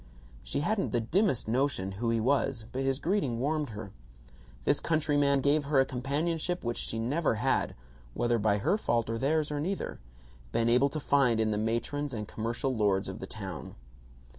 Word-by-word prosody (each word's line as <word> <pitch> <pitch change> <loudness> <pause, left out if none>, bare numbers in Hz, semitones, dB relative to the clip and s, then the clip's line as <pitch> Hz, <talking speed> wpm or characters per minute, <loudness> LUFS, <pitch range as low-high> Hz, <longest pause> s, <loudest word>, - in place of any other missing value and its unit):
She - - -2
hadn't 200 +2 0
the 120 - +3
dimmest 155 - +1
notion 120 -5 0
who 115 +5 -2
he 115 0 +2
was, 130 -1 +1
but 130 - -2
his 135 -1 +1
greeting 160 - 0
warmed 150 +2 0
her. 105 -2 -7 0.7
This - - +2
countryman 145 -3 +2
gave 145 +2 +2
her 140 -1 +3
a 135 - +5
companionship 155 +7 -2
which 120 0 -2
she 115 - -2
had 115 - -1
never 145 -2 +1 0.8
(whether 120 -1 +1
by 105 -1 +2
her 160 - +1
fault 115 - 0
or 115 - -2
theirs 150 +3 +1
or 145 - -1
neither) 185 +6 -3 0.5
been 115 - +2
able 125 +4 +4
to 155 - -4
find 135 -6 +3
in 110 -1 +2
the 105 - 0
matrons 120 +5 -1
and 105 -2 -4
commercial 120 +5 -2
lords 100 -3 +2
of - - -6
the - - -6
town. - - -7
130 Hz, 185 wpm, -30 LUFS, 115-145 Hz, 0.8 s, a